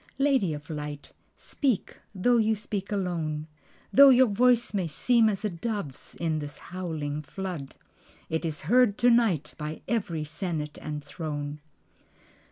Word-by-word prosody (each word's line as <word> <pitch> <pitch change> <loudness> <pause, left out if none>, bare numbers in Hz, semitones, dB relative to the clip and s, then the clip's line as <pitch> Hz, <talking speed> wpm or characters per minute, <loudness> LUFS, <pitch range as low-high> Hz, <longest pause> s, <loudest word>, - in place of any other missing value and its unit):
Lady 270 - +2
of 150 0 -6
Light, 150 -1 -6 0.2
speak, 260 -9 -2 0.2
though 240 +6 +3
you 220 0 +3
speak 200 -1 -5
alone, 165 -6 -2 0.5
Though 280 +1 +9
your 260 0 +7
voice 240 +2 +3
may 190 -4 0
seem 225 +8 +3
as 205 0 -2
a - - +1
dove's 175 - -5
in 160 -2 -1
this 145 -1 -6
howling 160 -5 -4
flood, 165 -2 -6 0.5
It 160 +1 -2
is 155 -2 -2
heard 245 -4 +4
to 245 0 +5
night 195 - +2
by 150 +1 -5
every 180 -9 -1
senate 155 -1 -4
and 150 -1 -5
throne. 145 -1 -5
175 Hz, 145 wpm, -27 LUFS, 150-220 Hz, 0.5 s, Though